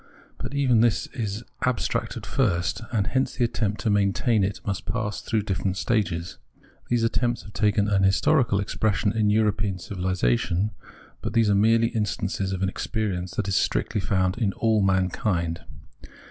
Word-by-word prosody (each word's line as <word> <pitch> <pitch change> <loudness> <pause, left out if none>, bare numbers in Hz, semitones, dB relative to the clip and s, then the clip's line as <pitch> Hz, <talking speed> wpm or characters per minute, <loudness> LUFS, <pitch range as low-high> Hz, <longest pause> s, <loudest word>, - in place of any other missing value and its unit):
But 140 - -5
even 130 -5 +3
this 115 -2 +2
is 110 -2 -3 0.2
abstract 125 -2 -1
at - - -8
first, 100 -6 0
and 105 -5 +1
hence 130 +1 0
the 125 - +1
attempt 110 -3 -1
to 110 - +1
maintain 100 +2 +2
it 100 +2 -1
must 100 -2 -3
pass 110 -4 -2
through 110 -2 -1
different 95 -1 -2
stages. 90 -8 -1 0.5
These 120 -1 +2
attempts 120 +1 0
have 105 - -12
taken 105 -1 +2
historical 100 +4 +3
expression 100 +1 0
in 110 -2 +2
European 105 -2 +1
civilisation, 90 - 0 0.5
but - - -4
these 115 -3 +3
are - - +4
merely 115 +3 +4
instances 100 -4 -2
of 95 0 -2
an - - +2
experience 95 -4 -3
that - - -1
is 95 - 0
strictly 105 - 0
found 95 +2 0
in 100 -5 +1
all 110 -2 +2
mankind. 95 -3 0
105 Hz, 160 wpm, -25 LUFS, 95-115 Hz, 0.5 s, are